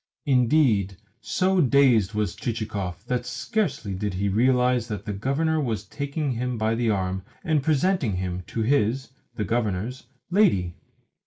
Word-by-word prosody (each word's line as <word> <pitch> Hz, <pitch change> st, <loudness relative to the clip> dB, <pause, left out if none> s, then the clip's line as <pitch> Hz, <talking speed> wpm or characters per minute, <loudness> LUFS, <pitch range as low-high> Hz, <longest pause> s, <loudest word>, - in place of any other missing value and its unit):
Indeed, 125 Hz, -, +3 dB, 0.2 s
so 185 Hz, 0 st, +1 dB
dazed 125 Hz, -, +4 dB
was 105 Hz, -4 st, -1 dB
Chichikov 105 Hz, -5 st, -4 dB
that 125 Hz, 0 st, -1 dB
scarcely 210 Hz, -, -2 dB
did 100 Hz, 0 st, -3 dB
he 100 Hz, +2 st, 0 dB
realise 125 Hz, +2 st, +2 dB
that 105 Hz, -3 st, -5 dB
the 105 Hz, -, -3 dB
Governor 150 Hz, +9 st, 0 dB
was 115 Hz, -7 st, -2 dB
taking 140 Hz, -, -3 dB
him 125 Hz, 0 st, -2 dB
by 110 Hz, 0 st, +1 dB
the 115 Hz, 0 st, 0 dB
arm 95 Hz, -2 st, -1 dB, 0.2 s
and 160 Hz, -5 st, +1 dB
presenting 155 Hz, -, +1 dB
him 90 Hz, 0 st, -3 dB
to 115 Hz, -, -2 dB
his 130 Hz, +1 st, +1 dB, 0.2 s
(the 105 Hz, -, -2 dB
Governor's) 115 Hz, +2 st, -2 dB, 0.2 s
lady. 135 Hz, -, +3 dB
115 Hz, 145 wpm, -25 LUFS, 100-140 Hz, 0.2 s, dazed